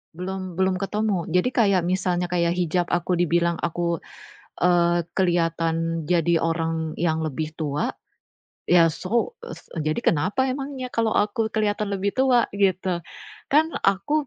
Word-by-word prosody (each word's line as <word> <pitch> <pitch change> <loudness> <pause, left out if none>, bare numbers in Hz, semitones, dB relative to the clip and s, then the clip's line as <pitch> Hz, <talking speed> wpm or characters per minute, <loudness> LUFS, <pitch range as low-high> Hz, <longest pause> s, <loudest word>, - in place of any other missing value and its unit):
belum 185 0 -5
belum 190 0 +2
ketemu. 205 -2 -1
Jadi 180 +7 +2
kayak 200 -6 +3
misalnya, 180 -1 0
kayak 170 -1 +2
hijab 175 0 0
aku 175 +1 -1
dibilang 170 0 +1
aku, 170 0 -1 0.6
eee, 175 -1 +3 0.2
keliatan 165 -2 0
jadi 170 -1 +2
orang 165 -1 -1
yang 160 -2 +1
lebih 155 +1 -3
tua. 150 -2 -1 0.8
Ya 170 -2 +5
so 235 - -2
es - - -9 0.2
eee, 155 - -3
jadi - - -2
kenapa 185 - 0
emangnya 270 -1 -5
kalo 225 -2 0
aku 210 +2 +1
keliatan 210 -1 0
lebih 200 +1 -1
tua? 255 -3 +3
Gitu. 190 -2 +1 0.5
Kan 315 +3 +4 0.2
aku 200 +11 +1
180 Hz, 140 wpm, -24 LUFS, 165-205 Hz, 0.8 s, Ya